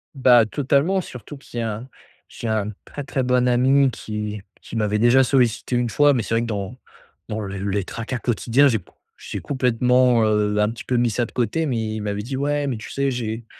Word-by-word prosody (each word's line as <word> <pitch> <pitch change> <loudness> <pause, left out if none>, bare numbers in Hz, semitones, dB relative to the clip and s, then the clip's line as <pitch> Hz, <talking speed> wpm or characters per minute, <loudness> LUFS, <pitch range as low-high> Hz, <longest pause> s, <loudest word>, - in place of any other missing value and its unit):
Bah, 125 -4 +5
totalement 145 - +1
surtout 140 -1 -10
qu'il 120 -3 -8
y - - -1
a 110 -2 -2
un 125 +4 -10 0.4
j'ai 115 - -7
un 105 -1 -1
très, 145 -2 -8
très 130 -3 -1
bon 125 0 +2
ami 135 +3 +4
qui 105 -2 -5 0.2
qui - - -10
m'avait 105 -1 0
déjà 120 +3 +5
sollicité 125 -2 +1
une 120 -1 0
fois, 145 +4 +4
mais 120 -5 0
c'est - - -4
vrai 115 - +2
que - - -2
dans 100 +1 -4 0.5
dans 110 - -3
le 100 -2 -5
les 100 0 0
tracas 120 +2 -5
quotidiens 120 +4 +2
j'ai 115 - +2
c - - -19 0.4
j'ai - - -6
complètement, 125 -2 +2
heu, 105 -1 +1
un 105 - +2
petit 115 - -7
peu 125 - -2
mis 120 0 +2
ça 120 +2 0
de - - -13
côté, 125 +7 -1
mais 110 -6 -2
il 110 - -4
m'avait 105 0 -3
dit: 130 +5 -5
«Ouais, 145 0 0
mais 125 - -2
tu 110 - -9
sais 140 0 0
j'ai 115 -1 -4
120 Hz, 225 wpm, -22 LUFS, 110-130 Hz, 0.5 s, Bah